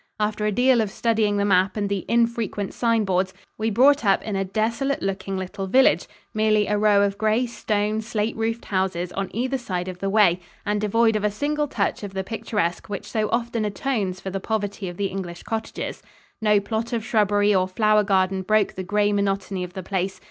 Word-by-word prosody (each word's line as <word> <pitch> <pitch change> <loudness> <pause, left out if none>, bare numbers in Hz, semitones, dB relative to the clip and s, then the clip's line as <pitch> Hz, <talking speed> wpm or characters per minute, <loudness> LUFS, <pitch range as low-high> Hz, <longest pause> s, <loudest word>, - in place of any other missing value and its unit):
After 210 0 0
a - - +1
deal 245 +2 +4
of 215 - -1
studying 215 -1 +1
the 200 - +1
map 190 0 +2
and 205 -1 0
the 200 -2 -2
infrequent 230 -4 0
sign 230 -3 +1
boards 185 0 0 0.2
we 220 +1 +1
brought 265 +6 +4
up 195 -2 +3
in 215 -2 -3
a 195 - 0
desolate 230 +8 -1
looking 195 0 -2
little 190 +1 -4
village, 260 +7 +4 0.3
merely 215 -1 +3
a 210 - 0
row 205 -1 +4
of 200 0 -1
gray 220 +3 +2
stone, 215 -2 -1
slate 220 0 -2
roofed 225 +1 -2
houses 185 -2 -1
on 195 0 -3
either 255 +4 -1
side 180 -6 -3
of 185 -1 -6
the 195 - -1
way, 195 -4 +4 0.3
and 210 0 0
devoid 225 +2 +3
of 210 - -1
a 210 - +3
single 295 +7 -1
touch 205 -7 -1
of 200 -2 -7
the 190 - -1
picturesque 205 -4 -2
which 200 -2 -5
so 215 -2 -1
often 235 -1 -1
atones 205 -3 -2
for 190 - -6
the 195 - -2
poverty 205 -2 -3
of 175 - -9
the 200 - -1
English 185 -3 -5
cottages. 225 0 -4 0.4
No 210 -1 +4
plot 220 +4 -3
of 225 -2 -2
shrubbery 210 -3 +3
or 185 -1 +2
flower 215 +2 +3
garden 190 -1 +1
broke 215 +1 +2
the 185 - -5
gray 205 +2 +1
monotony 195 -2 -1
of 180 0 -7
the 190 -1 -6
place. 190 0 -2
210 Hz, 205 wpm, -23 LUFS, 195-225 Hz, 0.4 s, deal